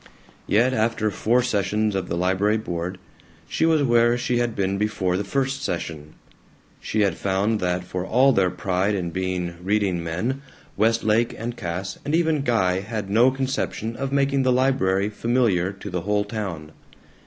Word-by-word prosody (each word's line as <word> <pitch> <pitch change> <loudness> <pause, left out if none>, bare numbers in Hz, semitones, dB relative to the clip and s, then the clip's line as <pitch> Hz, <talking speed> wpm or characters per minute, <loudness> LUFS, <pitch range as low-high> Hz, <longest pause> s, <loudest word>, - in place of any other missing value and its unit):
Yet 120 +5 +3
after 110 -2 0
four 120 +5 +2
sessions 105 -2 0
of 95 -2 -3
the 85 - -1
library 95 +4 +2
board 90 -3 -4 0.5
she 160 - +1
was 160 -3 +3
where 120 -1 +4
she 125 0 0
had 120 -2 -1
been 100 0 -1
before 100 -4 0
the 100 - -1
first 135 +6 -1
session. 80 - -4 0.6
She 110 - -1
had 100 -5 +2
found 100 +3 0
that 90 -1 -1
for 90 0 -4
all 130 +7 +4
their 95 -4 +3
pride 95 +2 0
in 85 -3 -3
being 90 -1 -3
reading 95 -3 0
men, 110 +12 -2 0.3
Westlake 115 +2 +2
and 120 +2 -4
Cass 95 +1 -5
and 150 - 0
even 160 -3 +2
Guy 95 -8 +1
had 105 -1 -5
no 115 +5 +5
conception 130 -4 -2
of 135 +1 -3
making 140 0 +2
the 130 -1 +2
library 105 -7 +2
familiar 105 -5 +1
to 100 +1 -8
the 90 -1 -2
whole 105 +2 0
town. 95 -8 -5
105 Hz, 165 wpm, -23 LUFS, 95-120 Hz, 0.6 s, no